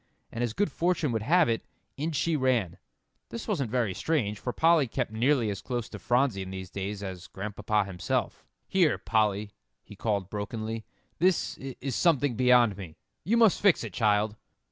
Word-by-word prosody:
And 115 - -3
as 120 -3 -1
good 200 -4 0
fortune 170 -3 0
would 110 -2 -1
have 170 +9 +4
it, 115 -1 0 0.3
in 155 +4 -2
she 160 +2 0
ran. 130 - 0 0.5
This 230 - -6
wasn't 150 - -1
very 115 -5 0
strange, 105 - -1
for 125 - -3
Polly 160 -1 +4
kept 110 - -2
nearly 120 0 +2
as 100 - -5
close 120 -3 -3
to - - -8
Phronsie 120 -5 +1
in 95 - -6
these 95 -1 -7
days, 100 +1 -4
as 90 -2 -7
Grandpapa 105 +1 -2
himself. 90 -3 -2 0.2
"Here, 175 -7 +3
Polly," 105 -2 0 0.3
he 105 - -13
called 100 -3 -1
brokenly, 110 +2 -4 0.3
"this 180 +1 +2
is 135 -1 -5
something 145 -7 +2
beyond 125 -4 +4
me. 90 -6 -9 0.3
You 230 +5 +2
must 225 -5 +4
fix 200 -4 +4
it, - - -6
child." 105 -1 +2
115 Hz, 175 wpm, -28 LUFS, 105-145 Hz, 0.5 s, have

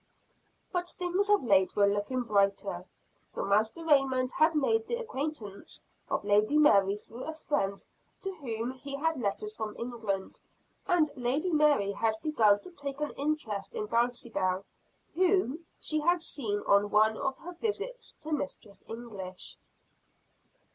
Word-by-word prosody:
But 355 -1 -1
things 370 +3 -1
of 415 -6 +4
late 195 -5 +3
were 205 - +5
looking 205 +5 0
brighter, 200 -3 +1 0.5
for - - -2
Master 220 +10 +1
Raymond 270 -4 +3
had 315 +1 +3
made 445 +10 +2
the 475 - 0
acquaintance 290 - -5 0.3
of - - -1
Lady 210 +7 +3
Mary 200 -10 +5
through 230 +3 -11
a 315 - -4
friend 285 -11 -2 0.4
to 385 0 -3
whom 235 -4 -2
he 275 +2 -7
had 315 -1 0
letters 210 0 -2
from 215 -2 -5
England, 225 -5 -4 0.5
and 325 -4 +3
Lady 270 +8 0
Mary 295 -10 +4
had 220 +2 0
begun 215 -10 +4
to 365 - -9
take 280 -4 -5
an 300 -1 -1
interest 275 -9 -2
in 210 - -2
Dulcibel, 230 -5 0 0.5
whom 345 -3 +1
she 310 - 0
had 345 +3 +3
seen 210 -11 -2
on 200 +1 +4
one 215 +1 +4
of 265 +3 -2
her 355 - -9
visits 455 +6 -4
to 315 +1 -6
Mistress 260 -8 -4
English. 200 -6 -7
255 Hz, 145 wpm, -30 LUFS, 210-310 Hz, 0.5 s, were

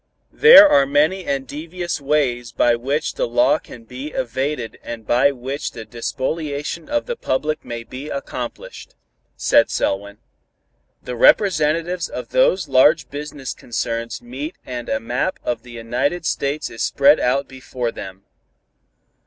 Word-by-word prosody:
"There 450 -9 +9
are 140 - +4
many 155 +7 +2
and 135 -1 -2
devious 170 +3 -5
ways 135 -5 0
by 120 - +3
which 140 +6 -2
the - - -1
law 305 -3 +3
can 120 - -13
be 125 +5 -8
evaded 130 -3 -3
and 115 -2 -8
by 125 +6 +3
which 135 +2 -5
the 110 -2 -8
despoliation 145 +6 -4
of 295 0 0
the 485 - -3
public 150 - -2
may 120 -1 -6
be 130 +5 -8
accomplished," 125 -4 -7 0.4
said - - +4
Selwyn. 100 +1 -2 0.9
"The 125 - -5
representatives 165 - +3
of - - -7
those 195 - +2
large 145 +4 +4
business 145 -2 -6
concerns 115 0 -4
meet 135 +7 -6
and 120 -1 -6
a 110 - 0
map 125 +11 -2
of 120 -2 -2
the 120 0 -14
United 125 +9 -2
States 140 +1 -2
is 115 - -7
spread 140 +2 +4
out 135 +3 +1
before 130 -2 -5
them. 95 -2 -9
140 Hz, 145 wpm, -20 LUFS, 120-155 Hz, 0.9 s, There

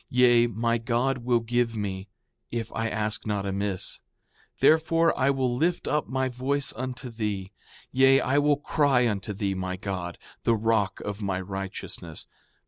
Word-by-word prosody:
Yea, 120 -1 +5
my 115 +1 0
God 125 +3 0
will 120 -1 +1
give 120 0 0
me, 100 -2 -4 0.4
if 115 -1 -4
I 115 0 -1
ask 110 0 -2
not 100 -2 -1
amiss; 100 -1 -2 0.6
therefore 165 +1 +4
I 130 0 +2
will 130 -3 +1
lift 170 +7 0
up 150 0 0
my 130 0 0
voice 135 +3 -1
unto 125 +1 -5
thee; 105 -4 -3 0.4
yea, 135 +1 +6
I 140 +2 +2
will 145 0 +3
cry 140 -4 +2
unto 105 -2 -2
thee, 100 -1 -1
my 95 0 -3
God, 90 -3 -4 0.2
the 115 - +3
rock 110 -3 +1
of 105 +1 -5
my 95 -2 -1
righteousness. 95 0 -6
115 Hz, 155 wpm, -27 LUFS, 100-130 Hz, 0.6 s, yea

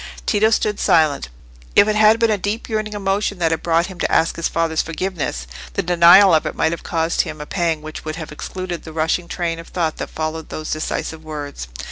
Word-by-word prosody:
Tito 215 +1 +3
stood 210 -2 0
silent. 150 - +2 0.5
If 205 - +7
it 215 - +1
had 215 +1 +6
been 230 -1 +2
a 210 - +2
deep 205 +5 -3
yearning 215 -1 -2
emotion 200 0 -1
which 165 -2 +1
had 160 - -1
brought 170 0 +2
him 185 -1 -10
to - - -1
ask 165 - +2
his 165 - -1
father's 165 -1 0
forgiveness, 165 - -3 0.3
the - - -1
denial 175 +2 +7
of 155 - +3
it - - -4
might 160 - +1
have 170 - -4
caused 165 -1 0
him 155 - -6
a 150 - -6
pang 165 -3 -1
which 155 0 -8
would 155 0 -4
have 160 -2 -7
excluded 180 +3 -5
the 160 - -10
rushing 160 +2 0
train 170 -1 -3
of 165 - -10
thought 165 -3 -2
that - - -5
followed 155 0 -4
those 155 0 -5
decisive 155 +1 -3
words. 145 - -6
165 Hz, 220 wpm, -20 LUFS, 155-195 Hz, 0.5 s, If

